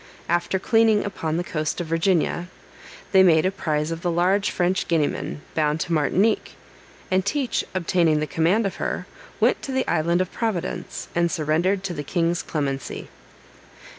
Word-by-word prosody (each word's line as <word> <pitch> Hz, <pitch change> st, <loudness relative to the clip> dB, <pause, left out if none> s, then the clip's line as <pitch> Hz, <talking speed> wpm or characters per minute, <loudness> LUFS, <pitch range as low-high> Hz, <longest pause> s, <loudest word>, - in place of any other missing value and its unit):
After 175 Hz, +2 st, +1 dB
cleaning 225 Hz, +1 st, +3 dB
upon 165 Hz, -5 st, -2 dB
the 175 Hz, -, -1 dB
coast 155 Hz, -2 st, -2 dB
of 175 Hz, -, -2 dB
Virginia, 165 Hz, +1 st, +1 dB, 0.6 s
they 190 Hz, -, +7 dB
made 165 Hz, -3 st, +5 dB
a 185 Hz, -, +2 dB
prize 155 Hz, -5 st, -1 dB
of 165 Hz, 0 st, -5 dB
a 175 Hz, -, +1 dB
large 185 Hz, +4 st, +2 dB
French 180 Hz, +1 st, 0 dB
Guineaman 150 Hz, -2 st, -1 dB
bound 150 Hz, 0 st, +1 dB
to 170 Hz, -, -2 dB
Martinique, 185 Hz, +8 st, +1 dB, 0.6 s
and 185 Hz, 0 st, +3 dB
Teach 260 Hz, +5 st, 0 dB
obtaining 170 Hz, -3 st, +2 dB
the 155 Hz, -, 0 dB
command 170 Hz, +8 st, +1 dB
of 195 Hz, -, -3 dB
her, -, -, -3 dB, 0.3 s
went -, -, +3 dB
to 275 Hz, -, -5 dB
the 260 Hz, 0 st, 0 dB
island 170 Hz, +3 st, +1 dB
of 185 Hz, -1 st, -1 dB
Providence, 220 Hz, -7 st, -3 dB
and 170 Hz, 0 st, +2 dB
surrendered 175 Hz, +4 st, +1 dB
to 190 Hz, -3 st, -3 dB
the 145 Hz, -, -4 dB
king's 170 Hz, +3 st, 0 dB
clemency. 140 Hz, -3 st, -4 dB
175 Hz, 165 wpm, -23 LUFS, 160-190 Hz, 0.6 s, they